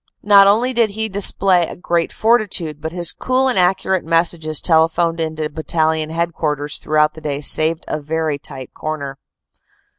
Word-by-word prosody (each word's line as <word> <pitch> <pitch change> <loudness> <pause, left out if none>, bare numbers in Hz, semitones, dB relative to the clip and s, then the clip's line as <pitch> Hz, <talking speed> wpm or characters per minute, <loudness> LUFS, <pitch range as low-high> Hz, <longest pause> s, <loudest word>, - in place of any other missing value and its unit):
Not 200 -1 +6
only 235 +6 +2
did 230 -2 +2
he 220 +2 -4
display 190 -3 +2
great 170 -1 -1
fortitude, 200 -10 -1
but 160 0 -5
his 175 -1 -1
cool 260 +1 0
and 250 -7 +1
accurate 185 0 +1
messages 165 -2 +1
telephoned 165 0 +1
in 160 -1 -3
to 155 -1 -3
Battalion 160 0 -1
Headquarters 160 -3 -3
throughout 150 0 +1
the 160 - -13
day 145 -2 -3
saved 155 +2 +3
a 150 - -4
very 155 -1 -3
tight 130 -2 -10
corner. 140 -3 -6
165 Hz, 155 wpm, -18 LUFS, 155-190 Hz, -, Not